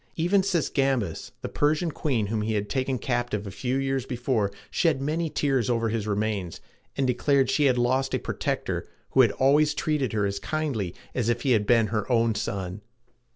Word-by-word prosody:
Even 175 +4 +3
Sisygambis, 135 - 0
the - - -2
Persian 155 +3 +1
queen 130 -8 -1
whom 110 +1 -1
he 110 +1 -1
had 105 0 -2
taken 130 -1 0
captive 120 -4 -2
a 100 - -6
few 125 +6 -2
years 135 -1 0
before, 120 -4 -1 0.2
shed 160 -6 +2
many 155 +4 -1
tears 135 -6 0
over 115 -1 +1
his 110 -1 -2
remains, 105 -4 -2 0.4
and 135 - +2
declared 130 +1 +2
she 150 - +2
had 130 -2 +3
lost 130 +2 +1
a - - +2
protector - - -3 0.2
who 135 - +6
had 115 -5 +4
always 150 +3 +3
treated 150 -7 0
her 105 -2 +1
as 100 0 -2
kindly 110 - -2 0.2
as 120 -3 0
if 120 0 0
he 135 - +2
had 105 -4 +2
been 115 -2 +5
her 110 +3 -1
own 115 -1 +3
son. 100 -2 -4
125 Hz, 190 wpm, -26 LUFS, 110-140 Hz, 0.4 s, who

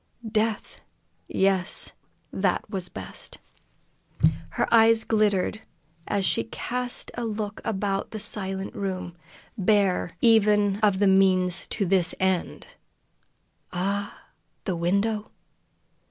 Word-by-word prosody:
Death 220 0 -1 0.5
yes, 190 -1 +1 0.4
that - - 0
was 190 -4 -5
best. - - -4 1.1
Her - - -1
eyes 225 0 +6
glittered 215 -1 +1 0.5
as 200 -2 0
she 115 - +2
cast 245 - -2
a 240 - -4
look 215 -2 -4
about 195 -2 -2
the 220 - -6
silent 195 -2 -3
room. 185 -3 -4 0.4
Bare, 190 -3 +1
even 210 -3 +4
of 205 -3 +3
the 200 - +2
means 190 -2 +3
to 205 - -1
this 180 -1 +3
end! 190 -2 -1 1.1
Ah, 200 +3 -2 0.4
the 185 - -2
window! 200 +5 0
200 Hz, 105 wpm, -25 LUFS, 190-215 Hz, 1.1 s, eyes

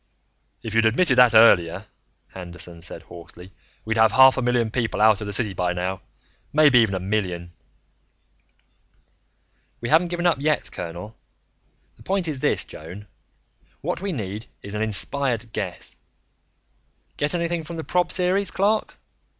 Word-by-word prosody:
"If 110 - -6
you'd 115 0 +4
admitted 130 +5 +2
that 120 -3 +6
earlier," 95 -4 +5 0.5
Anderton 90 -2 -9
said 85 - -8
hoarsely, 90 +2 -13 0.3
"we'd 110 +1 -1
have 110 0 +5
half 130 0 +7
a 130 - -2
million 120 -2 0
people 115 -3 -2
out 110 -1 +4
of 105 - -5
the - - -4
city 105 -1 0
by 90 0 -1
now. 90 +2 -3 0.5
Maybe 145 -4 +5
even 110 -4 +2
a - - -2
million." 90 -3 -3 2.3
"We 120 - -5
haven't 165 +3 +4
given 175 0 -3
up 165 -6 +2
yet, 150 +1 0
colonel. 90 +6 -7 0.8
The - - -20
point 190 -2 -1
is 150 -4 -3
this, - - 0
Joan: 90 +7 -10 0.8
what - - -3
we 200 0 -3
need 105 - -5 0.2
is 100 - -8
an 105 - -3
inspired 115 +2 -1
guess. 95 -4 -5 1.2
Get 145 +4 -1
anything 170 -1 -2
from 165 +2 -8
the 160 - -5
prob 180 +2 0
series, 190 +2 +1
Clark? 210 +3 0
110 Hz, 150 wpm, -23 LUFS, 95-150 Hz, 2.3 s, half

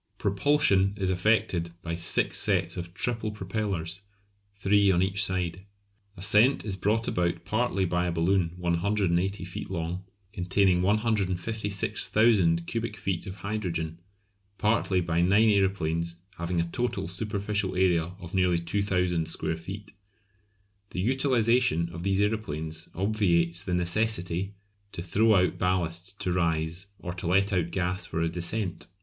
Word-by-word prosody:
Propulsion 100 -2 +2
is 95 -2 0
effected 90 -3 +1
by 85 - -3
six 85 0 +3
sets - - +1
of 85 -1 -6
triple 115 0 -1
propellers, 95 -3 -3 0.5
three 100 0 +3
on 90 0 +3
each 100 +1 +2
side. 95 -2 -1 0.6
Ascent 105 +8 +3
is 100 -3 -1
brought 110 +4 0
about 85 -1 -1
partly 110 -3 0
by 90 0 0
a - - 0
balloon 85 +1 +1
180 90 +1 0
feet 90 - -7
long, 90 0 -3 0.3
containing 95 -1 +2
156,000 100 -2 +1
cubic 115 +1 -3
feet 95 -1 -3
of 95 - -6
hydrogen, 85 -6 -3 0.6
partly 105 -3 +2
by 85 0 0
nine 100 +5 +4
aeroplanes 85 -5 +1 0.2
having 85 0 -1
a 85 - +1
total 100 -3 -2
superficial 100 0 -2
area 90 -2 +2
of 90 -2 -10
nearly 90 -2 +3
2000 90 -2 0
square 80 0 -3
feet. 100 +5 -8 1.0
The - - -5
utilisation 120 - +2
of 85 - -6
these 95 +2 +1
aeroplanes 80 -7 -3
obviates 90 -4 +1
the 90 -3 -1
necessity 90 0 0 0.4
to 85 - -5
throw 105 +5 +3
out 90 -3 +2
ballast 90 +1 -1
to 90 - 0
rise, 85 +1 -1
or 90 -2 -6
to 90 -1 -5
let 100 +3 +2
out 85 -2 +1
gas 90 +2 -2
for 80 - -3
a 85 - +1
descent. 90 +3 -3
95 Hz, 135 wpm, -27 LUFS, 85-105 Hz, 1.0 s, nine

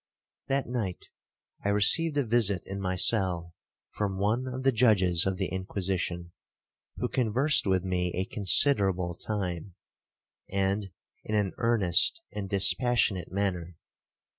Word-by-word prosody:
'That 135 0 0
night 110 -7 -5 0.5
I 100 - -1
received 145 +10 +3
a 140 - +1
visit 105 -5 +1
in 100 0 -7
my 95 -1 -2
cell 90 -4 +1 0.4
from 100 -2 -3
one 110 +6 -1
of 130 +1 -6
the 135 - +3
judges 95 -8 +3
of 95 -1 -2
the 95 -1 -3
Inquisition, 95 -2 -4 0.6
who 125 - -3
conversed 130 +3 +2
with 95 -1 +1
me 90 -1 -2
a 95 +1 -2
considerable 95 -4 +2
time, 90 -2 -5 0.8
and 100 +1 -1 0.3
in 110 - -4
an 100 -3 -1
earnest 115 - +2
and 100 -2 -6
dispassionate 100 -2 +2
manner. 90 -4 -3
100 Hz, 130 wpm, -27 LUFS, 90-115 Hz, 0.8 s, received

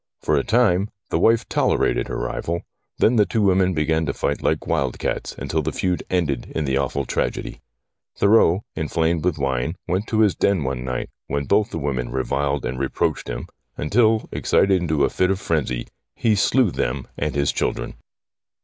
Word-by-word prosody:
For 75 - +2
a 70 - +2
time 105 -4 +2 0.2
the - - +1
wife 115 0 +3
tolerated - - +1
her - - -4
rival, 85 +1 -3 0.3
then 115 +2 +3
the 105 - +5
two 110 -3 0
women 95 -2 +3
began 80 +1 +1
to 70 - -1
fight 70 - -1
like - - 0
wild 65 -3 0
cats - - -3
until - - -1
the - - -2
feud 90 -1 -1
ended 85 -7 -1
in 80 - 0
the 65 -1 0
awful 70 0 -1
tragedy. - - -3 0.6
Thurreau, 100 -3 +4
inflamed 80 +1 0
with 90 -3 +1
wine, 70 +3 -1
went 95 +4 -1
to 110 -1 +1
his 105 -4 +4
den 100 -6 +1
one 65 -1 -3
night, 65 -1 -4 0.2
when 70 0 -2
both 105 +7 +2
the - - -5
women 70 -5 -2
reviled 70 +2 -1
and 65 - -3
reproached 70 -1 -1
him - - -4 0.3
until, 110 +7 +2
excited 95 -2 +2
into 80 -4 +1
a - - 0
fit 95 - +1
of 95 -1 0
frenzy, 65 -9 -1 0.3
he 115 - +2
slew 110 +2 +3
them 70 -4 -2
and 75 0 -2
his 70 0 +2
children. - - -2
80 Hz, 185 wpm, -22 LUFS, 70-100 Hz, 0.6 s, the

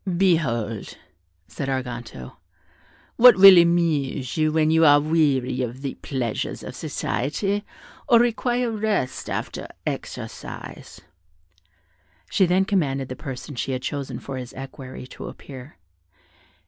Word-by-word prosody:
"Behold," 125 - 0 0.5
said 135 - -5
Arganto, 120 - -5 0.8
"what 245 +1 +9
will 195 0 +10
amuse 160 -7 +1
you 155 -1 +2
when 155 0 +2
you 160 0 +4
are 145 -2 +7
weary 145 -5 +1
of 125 +2 -5
the 135 - -3
pleasures 125 -5 -4
of - - -8
society, 195 - -2 0.5
or 235 - +7
require 240 +1 +1
rest 210 - -2
after - - -4 0.2
exercise." - - -7 1.3
She 190 - +3
then 185 +2 +2
commanded 140 -10 0
the 130 - -5
person 135 +3 -7
she 130 +1 -3
had 130 0 -4
chosen 140 0 -4
for 135 -1 -7
his 125 -1 -8
equerry 130 -1 -9
to - - -9
appear. 135 +1 -11
145 Hz, 120 wpm, -23 LUFS, 130-175 Hz, 1.3 s, will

